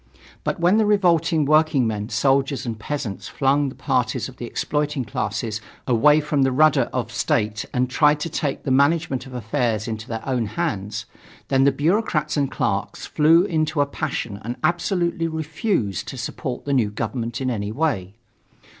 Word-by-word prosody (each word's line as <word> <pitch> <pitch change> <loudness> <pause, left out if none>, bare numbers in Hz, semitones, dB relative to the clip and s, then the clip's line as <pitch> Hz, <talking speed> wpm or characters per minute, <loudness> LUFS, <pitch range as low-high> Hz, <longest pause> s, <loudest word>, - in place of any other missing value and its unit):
But - - -2
when 175 +5 +4
the 220 - +3
revolting 170 -6 +3
workingmen, 135 -9 +2
soldiers 135 0 +1
and 115 -2 -4
peasants 125 -5 -4
flung 140 +1 +1
the 130 - -11
parties 125 -4 0
of 130 -1 -12
the 120 - -6
exploiting 150 0 -1
classes 110 +1 -3 0.2
away 150 +5 +4
from 150 -1 0
the 135 0 +3
rudder 140 -1 +4
of 120 -3 -3
State 110 -2 0
and 125 +1 +1
tried 150 +3 +3
to - - -1
take 145 -3 -2
the 135 - -1
management 140 0 +2
of 130 - -9
affairs 115 -1 -1
into 110 -1 -5
their 115 +1 -5
own 125 -4 0
hands, 105 - -3 0.4
then 135 0 +4
the 140 - +5
bureaucrats 155 -2 0
and 140 -3 +1
clerks - - -2
flew 160 +3 +4
into 155 -4 0
a 145 - +4
passion 130 -8 -4
and 120 +3 -4
absolutely 175 0 0
refused 160 - -2
to 130 - -6
support 125 +2 -5
the 140 - 0
new 120 -6 +2
government 115 +2 -3
in 130 -1 -1
any 105 -3 -3
way. 110 - -1
135 Hz, 170 wpm, -22 LUFS, 115-155 Hz, 0.4 s, the